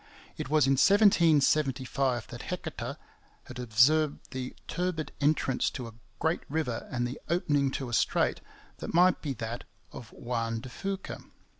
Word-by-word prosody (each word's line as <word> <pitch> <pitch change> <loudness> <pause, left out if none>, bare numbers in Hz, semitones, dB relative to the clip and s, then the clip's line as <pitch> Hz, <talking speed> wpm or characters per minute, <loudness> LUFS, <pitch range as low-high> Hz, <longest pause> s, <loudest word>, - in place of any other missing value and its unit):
It - - -5
was 155 -2 +4
in 135 - +2
1775 140 - +3
that - - -8
Heceta - - -4 0.5
had 125 -1 -10
observed 135 +6 +3
the 130 -1 -5
turbid 175 -2 -2
entrance 140 -3 +2
to 125 -3 -6
a 115 - -10 0.2
great 160 +1 0
river 140 -6 -2
and 120 -1 -1
the 125 - -7
opening 145 -5 +2
to 135 0 -4
a 120 - -7
strait - - +1 0.4
that - - -5
might 180 +1 +5
be 145 -3 -2
that 115 0 -5 0.3
of 120 -1 -10
Juan 115 -2 -3
de 130 - -9
Fuca. 195 +7 -5
135 Hz, 150 wpm, -29 LUFS, 125-155 Hz, 0.5 s, might